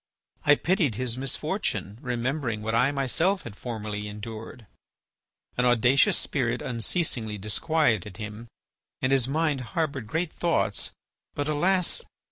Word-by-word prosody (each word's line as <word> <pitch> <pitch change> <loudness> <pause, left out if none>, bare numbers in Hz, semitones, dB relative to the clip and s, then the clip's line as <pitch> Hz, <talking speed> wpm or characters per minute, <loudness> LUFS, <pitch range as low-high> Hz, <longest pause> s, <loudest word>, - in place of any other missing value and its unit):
I 145 - +8
pitied 165 - +1
his 120 0 -1
misfortune, 130 - -2
remembering 125 -2 -1
what 110 +1 -1
I 125 +4 +4
myself 160 +8 +1
had 115 -4 -8
formerly 105 -3 -4
endured. 110 +2 -8 0.9
"An 125 - +3
audacious 120 +2 +5
spirit 125 -5 0
unceasingly 115 -3 -1
disquieted 105 - +1
him, 105 +2 -7 0.6
and 130 - +3
his 135 -2 +4
mind 150 -1 +1 0.2
harboured 140 -8 0
great 160 +6 -1
thoughts, 170 -1 +1 0.5
but 145 0 -1
alas! 180 +4 +2
125 Hz, 120 wpm, -27 LUFS, 110-150 Hz, 0.9 s, I